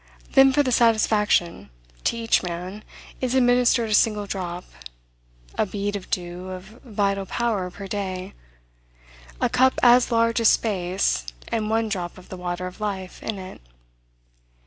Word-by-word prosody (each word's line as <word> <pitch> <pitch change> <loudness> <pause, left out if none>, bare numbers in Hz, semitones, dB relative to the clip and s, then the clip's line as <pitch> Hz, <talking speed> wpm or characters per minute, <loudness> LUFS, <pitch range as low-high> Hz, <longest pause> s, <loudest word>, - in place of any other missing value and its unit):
Then 270 0 +7
for 290 +2 +3
the 255 - -1
satisfaction, 215 - +2 0.4
to - - +1
each 230 0 +2
man 180 +3 -6 0.4
is 255 0 0
administered 245 -2 +3
a - - +2
single 210 -1 +3
drop, 180 -3 -5 0.9
a - - +2
bead 205 +1 -3
of 195 - -7
dew 180 +1 -4
of 185 +4 -10
vital 200 -4 -1
power 215 -6 -1
per 195 +2 -9
day, 190 -1 -4 1.1
a - - +2
cup 260 +1 +3
as 245 0 +6
large 230 0 +2
as 225 - +5
space, 180 - 0 0.2
and 215 -2 -1
one 225 0 +1
drop 180 -5 -4
of 185 - -15
the 185 - -7
water 180 0 -4
of 185 +3 -8
life 190 -3 -4
in 220 - -4
it. 185 -1 -9
205 Hz, 150 wpm, -24 LUFS, 185-230 Hz, 1.1 s, Then